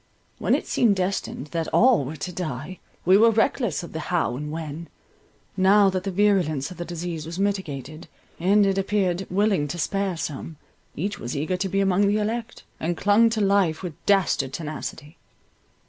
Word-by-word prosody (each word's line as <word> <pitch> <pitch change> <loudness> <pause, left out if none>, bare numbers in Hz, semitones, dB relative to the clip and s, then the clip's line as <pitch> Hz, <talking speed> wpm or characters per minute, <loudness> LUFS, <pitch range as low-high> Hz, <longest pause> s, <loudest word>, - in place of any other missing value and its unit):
When - - +2
it - - -3
seemed 225 -5 +2
destined 185 -6 -3
that 165 -1 -2
all 250 - +4
were 150 +5 -6
to 180 +3 -5
die, 160 0 -5 0.3
we 185 +2 +6
were 230 +1 +7
reckless 225 - +1
of 170 - -9
the 160 - -3
how 170 -8 0
and 150 +3 -5
when—now 170 +5 -1
that 185 0 -3
the - - -1
virulence 180 -7 +1
of 180 - -10
the 175 - -5
disease 170 -2 -5
was 170 +1 -6
mitigated, 155 -7 -3 0.3
and 200 +4 +4
it 195 0 +1
appeared 190 -2 0
willing 195 -5 +1
to 150 - -5
spare 195 +2 -1
some, 155 +1 -5 0.4
each 200 +6 -3
was 120 +4 -4
eager 155 +6 -1
to 190 +1 -2
be 195 +2 +1
among 195 +1 +3
the 205 +1 +2
elect, 225 +2 -3 0.2
and 170 +1 -2
clung 210 +3 +4
to 225 -1 -1
life 195 -5 +2
with 175 -3 -4
dastard 180 -9 +2
tenacity. 155 0 -6
185 Hz, 180 wpm, -24 LUFS, 160-200 Hz, 0.4 s, were